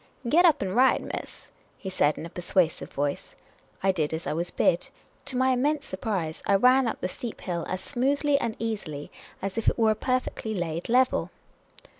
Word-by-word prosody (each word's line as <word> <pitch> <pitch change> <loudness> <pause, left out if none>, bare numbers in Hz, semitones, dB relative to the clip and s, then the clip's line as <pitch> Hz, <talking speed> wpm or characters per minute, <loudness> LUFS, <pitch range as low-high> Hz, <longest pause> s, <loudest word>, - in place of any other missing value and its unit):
" 250 - -10
Get 335 +8 +5
up 305 -7 +4
and 190 0 -3
ride, 260 +2 +4
miss," - - -7 0.3
he - - -9
said, 150 -5 +2
in - - -6
a - - -7
persuasive 180 -2 0
voice. 145 0 -3 0.5
I 195 - +4
did 160 -4 -1
as 160 - -6
I - - -1
was 170 +3 -2
bid. 170 - +1 0.4
To 255 - -2
my 260 +1 +3
immense 285 +3 +1
surprise, 190 -5 -3
I 200 - +4
ran 250 +5 +5
up 225 - -3
the - - 0
steep 230 +5 -6
hill 170 -2 -3
as 185 - -3
smoothly 280 +3 +1
and 230 -5 -2
easily 200 -11 -4 0.3
as 195 +3 -2
if 225 - -5
it - - -3
were 225 -2 +4
a - - +1
perfectly 255 -2 -2
laid 170 0 -3
level. 255 +2 +3
215 Hz, 200 wpm, -27 LUFS, 175-255 Hz, 0.5 s, Get